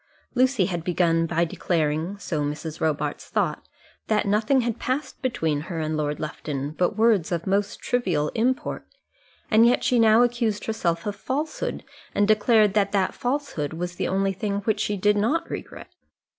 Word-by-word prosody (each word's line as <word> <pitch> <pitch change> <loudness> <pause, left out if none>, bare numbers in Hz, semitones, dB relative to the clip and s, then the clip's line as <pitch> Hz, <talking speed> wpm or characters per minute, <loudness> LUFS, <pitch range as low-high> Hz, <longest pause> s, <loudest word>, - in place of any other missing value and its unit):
Lucy 255 -5 +3
had 175 -3 -3
begun 165 -1 +2
by 170 +1 +1
declaring 160 +2 -1
so 160 -6 -3
Mrs. 150 +2 -4
Robarts 155 -2 -1
thought - - -1 0.4
that 215 - +1
nothing 215 +6 +2
had 235 -1 -2
passed 265 +4 -3
between 160 - 0
her 170 -3 -3
and 155 0 -1
Lord 150 -1 -2
Lufton 150 -2 -4
but 180 +6 0
words 220 -7 +3
of 170 -1 -2
most 200 +1 0
trivial 175 -12 0
import, 250 +3 -1 0.7
and 220 +1 +6
yet 240 +1 +4
she 245 - +3
now 225 +1 +6
accused 235 -4 0
herself 170 -7 -1
of 205 -1 -2
falsehood, 300 - -3 0.3
and 205 - +3
declared 215 -1 +4
that 200 -1 +1
that 195 -2 +1
falsehood 245 - -2
was 175 +2 -5
the - - -1
only 195 +1 +1
thing 200 +1 -2
which 215 +1 0
she 205 - -1
did 205 +2 +3
not 290 +12 +1
regret! - - -7
200 Hz, 170 wpm, -24 LUFS, 165-230 Hz, 0.7 s, and